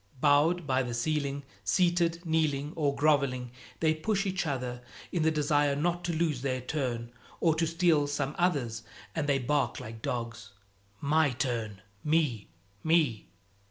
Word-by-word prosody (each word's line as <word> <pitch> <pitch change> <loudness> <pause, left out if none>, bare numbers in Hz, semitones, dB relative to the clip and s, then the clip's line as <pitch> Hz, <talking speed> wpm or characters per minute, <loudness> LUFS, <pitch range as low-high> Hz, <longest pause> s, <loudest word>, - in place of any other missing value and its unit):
Bowed 150 +5 +4
by 130 -2 +2
the 120 -2 -3
ceiling, 140 +2 -1 0.2
seated, 170 - +2
kneeling 155 -2 0
or 145 -3 +1
groveling, 140 -4 +2 0.3
they 160 -1 +4
push 195 +5 -1
each 185 -3 -1
other 125 -3 -3 0.3
in 175 - 0
the 160 - +4
desire 145 -2 +2
not 175 +4 0
to 175 - 0
lose 160 -5 0
their 130 -1 -1
turn 125 -4 -3 0.3
or 165 -2 +4
to 165 +1 0
steal 165 -3 +3
some 145 0 -2
other's, 140 -11 +1 0.3
and 145 +1 -1
they 140 - +4
bark 140 +2 0
like 110 0 -8
dogs, 115 -4 -4 0.5
"My 150 +1 +3
turn!" 120 -6 -2 0.2
"Me!" 150 -9 +1 0.4
"Me!" 155 -9 +2
145 Hz, 150 wpm, -30 LUFS, 125-160 Hz, 0.5 s, Bowed